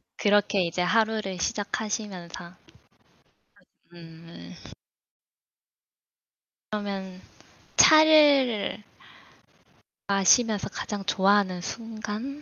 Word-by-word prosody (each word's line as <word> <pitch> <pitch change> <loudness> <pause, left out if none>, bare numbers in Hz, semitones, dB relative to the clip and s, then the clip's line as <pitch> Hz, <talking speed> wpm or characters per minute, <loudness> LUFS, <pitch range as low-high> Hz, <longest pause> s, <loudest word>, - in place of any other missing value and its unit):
그렇게 205 -1 +1
이제 170 +1 -3
하루를 215 -1 0
시작하시면서 195 -4 -5 1.4
음. 165 - -14 2.2
그러면 195 -3 -6 0.6
차를 290 -10 +4 1.3
마시면서 200 +2 +2
가장 205 -2 -6
좋아하는 195 -2 +1
순간? 225 +6 -7
205 Hz, 155 characters per minute, -25 LUFS, 185-220 Hz, 2.2 s, 차를